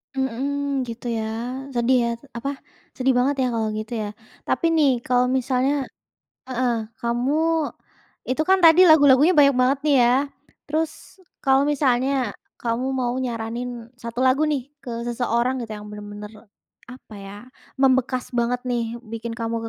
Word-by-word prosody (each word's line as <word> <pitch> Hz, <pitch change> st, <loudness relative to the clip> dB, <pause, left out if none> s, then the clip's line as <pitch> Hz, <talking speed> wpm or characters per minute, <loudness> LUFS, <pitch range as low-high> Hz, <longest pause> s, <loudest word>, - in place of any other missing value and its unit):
Mhm, 270 Hz, +1 st, -2 dB
gitu 235 Hz, +1 st, -5 dB
ya. 225 Hz, -1 st, -1 dB, 0.5 s
Sedih 240 Hz, +2 st, +3 dB
ya, -, -, 0 dB, 0.3 s
apa, 275 Hz, +4 st, -3 dB, 0.5 s
sedih 265 Hz, +1 st, +2 dB
banget 270 Hz, +3 st, +2 dB
ya, -, -, +2 dB
kalau 220 Hz, -1 st, 0 dB
gitu 215 Hz, +2 st, -5 dB
ya. 210 Hz, -, -3 dB, 0.4 s
Tapi -, -, 0 dB
nih 305 Hz, -4 st, +4 dB
kalau 250 Hz, 0 st, +2 dB
misalnya 265 Hz, +2 st, +1 dB, 0.6 s
heeh, 255 Hz, -1 st, 0 dB, 0.3 s
kamu 240 Hz, +4 st, 0 dB, 0.9 s
itu 260 Hz, +4 st, 0 dB
kan 380 Hz, 0 st, +5 dB
tadi 330 Hz, +3 st, +8 dB
lagu-lagunya 290 Hz, +1 st, +6 dB
banyak 280 Hz, -2 st, +6 dB
banget 265 Hz, +2 st, +2 dB
nih 290 Hz, -, +4 dB
ya. 240 Hz, -, +4 dB, 0.6 s
Terus 315 Hz, +1 st, 0 dB, 0.5 s
kalau 270 Hz, 0 st, +4 dB
misalnya, 270 Hz, -2 st, +1 dB, 0.2 s
kamu 235 Hz, +2 st, -1 dB
mau 250 Hz, -2 st, -1 dB
nyaranin 240 Hz, -1 st, -4 dB
1 235 Hz, +1 st, -6 dB
lagu 260 Hz, +4 st, +3 dB
nih 285 Hz, -1 st, -3 dB
ke 250 Hz, -, -8 dB, 0.2 s
seseorang 240 Hz, +1 st, 0 dB
gitu 225 Hz, -, -7 dB
yang 210 Hz, 0 st, -10 dB
benar-benar, 210 Hz, +1 st, -10 dB, 0.4 s
apa 250 Hz, -3 st, -13 dB
ya, 200 Hz, 0 st, -9 dB, 0.4 s
membekas 260 Hz, -1 st, +2 dB
banget 240 Hz, +1 st, 0 dB
nih, 235 Hz, -1 st, -2 dB
bikin 230 Hz, 0 st, -5 dB
kamu 230 Hz, -1 st, -2 dB
250 Hz, 145 wpm, -23 LUFS, 235-275 Hz, 0.9 s, tadi